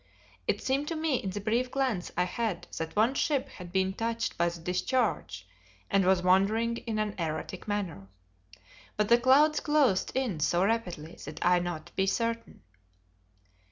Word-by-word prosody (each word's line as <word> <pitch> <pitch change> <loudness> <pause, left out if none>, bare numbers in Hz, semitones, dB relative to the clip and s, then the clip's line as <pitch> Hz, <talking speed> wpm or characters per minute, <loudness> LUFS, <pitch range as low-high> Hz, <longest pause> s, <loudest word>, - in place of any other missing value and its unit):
It - - 0
seemed 275 +2 0
to 330 - -2
me 315 -4 +1
in 195 - -4
the 190 - -4
brief 230 +5 0
glance 250 -9 -1
I 180 - +4
had 195 0 -2
that 160 0 -4
one 220 +5 +3
ship 280 -1 0
had 180 -7 -10
been 190 0 +1
touched 230 +2 -2
by 170 0 +2
the 170 0 -8
discharge 180 - -1 0.4
and 195 -1 +3
was 185 -1 +3
wandering 215 +6 +3
in 225 -2 -4
an 215 -1 -1
erratic 160 +4 -4
manner. 190 - -3 0.9
But 210 -1 +1
the 235 0 +6
clouds 285 +5 +5
closed 285 -11 +2
in 245 -11 -1
so 175 +4 +2
rapidly 180 -8 -2
that 150 - -5
I 180 0 +5
not 175 -3 -5
be 190 0 +1
certain. 230 +2 -2
210 Hz, 165 wpm, -29 LUFS, 180-240 Hz, 0.9 s, the